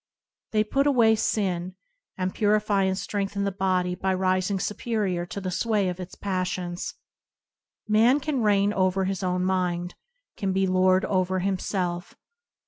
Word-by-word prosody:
They 215 -1 +3
put 275 +6 +1
away 235 -6 +5
sin, 185 -4 -1 0.4
and 185 0 -2
purify 210 -2 +2
and 190 0 0
strengthen 200 +1 -2
the 200 - 0
body 185 -2 0
by 190 +1 -1
rising 185 +1 +1
superior 200 -4 -2
to 200 - -5
the 185 -2 -4
sway 210 0 +1
of 180 0 -5
its 180 -1 -8
passions. 185 -2 -3 0.9
Man 225 +6 +4
can 285 -2 -1
reign 205 -1 +3
over 190 -1 +1
his 190 -1 -2
own 180 -1 0
mind; 180 -2 -1 0.4
can 195 -4 -1
be 190 0 +2
lord 185 0 +3
over 185 -1 0
himself. 185 -1 -2
190 Hz, 145 wpm, -26 LUFS, 185-205 Hz, 0.9 s, away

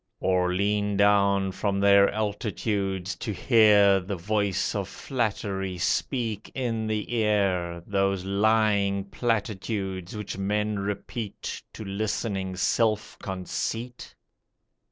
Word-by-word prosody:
Or 90 -1 +1
lean 100 +2 0
down 100 -1 +3
from 100 +1 -1
their 100 0 +6
altitudes 100 -2 -2
to 110 - -4
hear 105 -3 +5
The 95 +2 -4
voice 100 +1 0
of 100 -3 -2
flattery 100 -7 -2
speak 110 +4 -1
in 115 -4 -1
the 110 +2 -2
ear 95 -6 +1
Those 95 -2 0
lying 100 -1 +2
platitudes 100 -4 -2
which 105 -2 -5
men 105 +1 0
repeat 105 +2 -5
To 110 - -8
listening 100 -1 -2
Self 110 +2 0
Conceit? 110 +6 -4
100 Hz, 105 wpm, -26 LUFS, 95-110 Hz, -, their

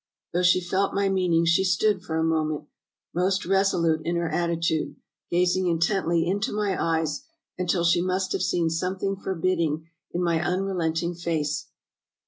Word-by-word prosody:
Though 175 - +2
she 180 0 +4
felt 190 +3 0
my 200 0 +2
meaning 180 -3 +2
she 165 +3 +3
stood 190 +1 +2
for 160 -3 -3
a 160 - +1
moment, 155 -2 0 0.5
most 190 +3 +1
reso 195 +1 +2
lute 160 -1 +2
in 170 +2 -1
her 170 -1 0
attitude, 170 -1 -1 0.3
gazing 180 +1 +2
intently 170 0 +1
into 200 +6 -1
my 205 -2 0
eyes, 160 - 0 0.3
until 180 -1 0
she 170 0 +3
must 185 +1 -1
have - - -1
seen 170 -3 +1
something 185 +4 -1
forbidding 170 -4 -1 0.3
in 175 - -1
my 170 -2 +2
unre 185 +3 -1
lenting 165 0 -1
face." 160 -4 -2
175 Hz, 160 wpm, -25 LUFS, 165-185 Hz, 0.5 s, she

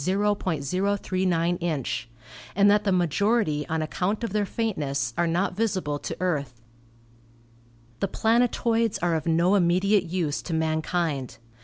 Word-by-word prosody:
039 185 -1 0
inch), 140 -9 -3 0.5
and 200 +1 +5
that 210 0 +2
the 200 - +2
majority 180 -2 +1
on 160 0 -1
account 190 +8 -2
of 230 - -3
their 210 -1 0
faintness 145 - -2
are 175 - +1
not 180 +3 0
visible 185 -9 -1
to - - -5
Earth. 145 -10 -2 1.4
The 195 - 0
planet 230 +5 +2
oids 230 -2 +2
are 175 -1 +2
of 160 0 -2
no 170 +3 +3
immediate 190 +1 +3
use 165 -4 -2
to 165 - -4
mankind. 160 -5 -1
180 Hz, 135 wpm, -25 LUFS, 155-200 Hz, 1.4 s, and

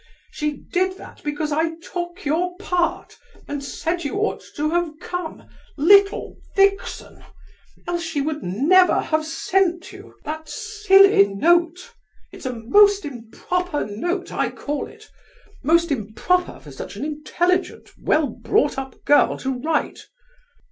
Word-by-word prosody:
She 300 -1 -2
did 370 +4 -1
that - - -13
because 295 +1 -2
I 325 +2 0
took 350 +2 -7
your 355 +5 0
part 360 -3 -2 0.3
and 285 -1 -4
said 330 +5 -3
you 285 - -3
ought 420 +2 -1
to 305 +1 -1
have 345 -2 0
come—little 360 +2 +1 0.2
vixen!—else 390 -3 -2
she 325 -3 -3
would 300 +1 -2
never 310 - +4
have 310 0 0
sent 355 +3 0
you 390 +1 -13
that 315 +1 -6
silly 405 - +5
note. 345 - +1 0.4
It's - - -7
a 255 - -2
most 400 - +4
improper 295 +7 -3
note, 345 - -3
I - - 0
call 290 0 -4
it; - - -16 0.5
most 335 +3 +3
improper 275 - -1
for - - -13
such - - -8
an - - -4
intelligent, 345 +5 -1
well 310 -1 +2
brought 240 +3 0
up 265 -1 -9
girl 290 - +4
to 265 0 -2
write. 310 +1 -2
330 Hz, 130 wpm, -22 LUFS, 290-360 Hz, 0.5 s, silly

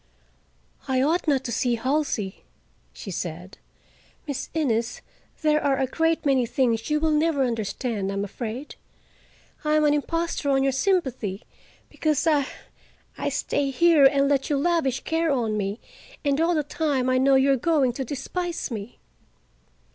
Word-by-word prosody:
"I 260 -1 +1
ought 325 +4 +1
not 275 -3 +2
to 235 - -4
see 240 +1 +1
Halsey," 255 -6 -2 0.5
she 195 - -8
said. 175 +1 -6 0.7
"Miss 285 -3 -4
Innes, 240 -6 -1 0.4
there 305 0 +3
are 275 -2 +2
a 265 - +1
great 325 +5 0
many 265 -4 +3
things 230 -2 0
you 300 0 +2
will 315 0 +1
never 305 -2 +2
understand, 225 -3 -2
I 195 - -3
am 200 - -1
afraid. 235 +6 -6 0.9
I 305 0 +2
am 305 0 +3
an 295 - +4
impostor 330 0 -1
on 270 -1 +3
your 270 - +2
sympathy, 260 - -1 0.4
because 305 -1 0
I—I 295 -4 -3
stay 285 -1 -1
here 310 +1 +5
and 275 +1 +4
let 275 0 +1
you 290 - +1
lavish 280 -4 +1
care 325 0 0
on 230 -5 0
me, 205 +1 -2 0.5
and 285 +1 +2
all 340 +1 +2
the 305 - +1
time 285 -3 -1
I 255 0 +3
know 270 +1 +4
you 265 +1 +4
are - - +4
going 270 -2 +2
to 265 - -3
despise 325 +5 -4
me." 215 0 -6
275 Hz, 160 wpm, -25 LUFS, 240-305 Hz, 0.9 s, here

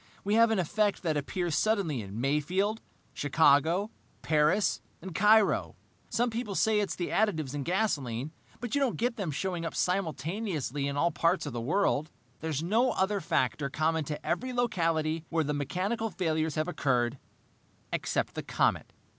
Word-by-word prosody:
"We 205 - 0
have 230 +1 +6
an 220 - +1
effect 205 +4 0
that 160 -3 0
appears 170 +3 -2
suddenly 175 - +1
in 100 +2 -7
Mayfield, 175 - 0 0.3
Chicago, 160 +7 +3 0.3
Paris, 155 +6 +2 0.2
and 190 -2 -8
Cairo. 210 +4 +4 0.3
Some 240 +1 +1
people 225 -3 -3
say 220 0 +3
it's 205 - -1
the 175 - -3
additives 160 -11 0
in 145 - -3
gasoline, 145 - -1 0.3
but 245 0 -5
you 285 - +2
don't 265 -4 +1
get 240 +1 0
them 195 -8 -3
showing 175 +3 -2
up 165 - -4
simultaneously 165 - -1
in 140 0 -3
all 170 +3 +2
parts 165 +1 +1
of 145 - -5
the 120 - -3
world. 155 +2 +1 0.3
There 160 - -4
is 155 0 -1
no 230 +8 +2
other 195 +1 0
factor 140 -2 0
common 155 +2 0
to 150 +1 -5
every 250 +9 -1
locality 165 -9 0
where 165 -1 +1
the 150 0 -1
mechanical 190 - -1
failures 160 -5 -1
have 155 +1 0
occurred, 125 -6 0 0.7
except - - -1
the - - -4
comet. - - 0
170 Hz, 165 wpm, -29 LUFS, 150-210 Hz, 0.7 s, have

